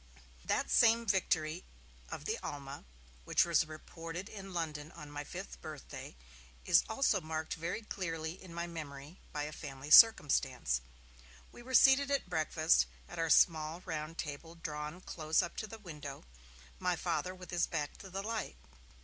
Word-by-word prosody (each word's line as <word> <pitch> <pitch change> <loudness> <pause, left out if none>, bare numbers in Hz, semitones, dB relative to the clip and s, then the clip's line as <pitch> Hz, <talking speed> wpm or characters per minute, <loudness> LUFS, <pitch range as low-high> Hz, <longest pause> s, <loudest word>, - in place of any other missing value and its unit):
That - - 0
same 230 0 +5
victory 175 -5 +1 0.5
of - - -6
the - - -1
Alma, 140 - -7 0.4
which - - +3
was 165 -2 +3
reported 165 +4 -7
in 195 -2 -8
London 155 -3 -3
on 150 -1 -10
my 145 0 -4
fifth - - -8
birthday, - - -8 0.5
is - - +6
also 220 -4 +2
marked 155 0 -3
very 170 +7 -3
clearly 165 -4 -4
in 185 - -11
my 170 +1 -3
memory 155 -1 -8
by 150 - -2
a 150 - -4
family 140 -2 -8
circumstance. 155 - +6 0.7
We - - -12
were 260 +2 -3
seated 270 +3 +7
at 280 -7 0
breakfast, 160 0 +3 0.2
at 175 - -8
our 165 -1 +1
small 160 +1 +4
round 160 -1 -4
table 160 +2 -6
drawn 150 +1 -5
close 155 -3 +1
up 170 - -6
to 215 - -3
the 225 - -8
window, 150 -9 -8 0.6
my - - +1
Father 185 +1 -2
with 180 -2 -11
his 175 -1 +1
back 150 -4 -3
to 195 - -10
the 195 +2 -4
light. 220 - -3
165 Hz, 160 wpm, -34 LUFS, 150-185 Hz, 0.7 s, seated